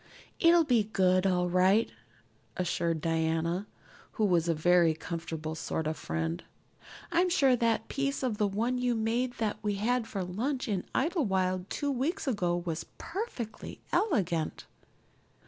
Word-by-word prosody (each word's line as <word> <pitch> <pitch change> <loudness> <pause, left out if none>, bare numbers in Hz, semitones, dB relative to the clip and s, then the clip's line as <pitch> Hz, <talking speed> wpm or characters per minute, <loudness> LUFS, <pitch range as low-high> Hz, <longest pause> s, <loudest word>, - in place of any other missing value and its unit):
"It'll 335 0 +6
be 240 -8 +2
good, 185 -2 +2
all 180 -1 +2
right," 185 +5 +3 0.7
assured 170 -2 0
Diana, 165 +4 0 0.5
who 215 - +1
was 175 -3 +2
a 165 - +2
very 170 0 +4
comfortable 160 -1 -5
sort 160 0 -3
of 155 +1 -1
friend. 165 +1 -3 0.7
"I'm 350 +1 +3
sure 275 -7 +4
that 230 -2 +1
piece 275 0 -2
of 230 -5 -1
the 210 - +3
one 230 +6 -1
you 245 -1 +1
made 235 +3 0
that 215 -3 -2
we 210 -2 -1
had 230 +3 0
for 195 -4 -3
lunch 250 +10 -2
in 200 -4 -1
Idlewild 190 - 0
two 285 -1 -1
weeks 295 +8 -2
ago 180 -8 +1
was 170 -2 -4
perfectly 335 - -6
elegant." 180 - 0
205 Hz, 145 wpm, -30 LUFS, 175-250 Hz, 0.7 s, It'll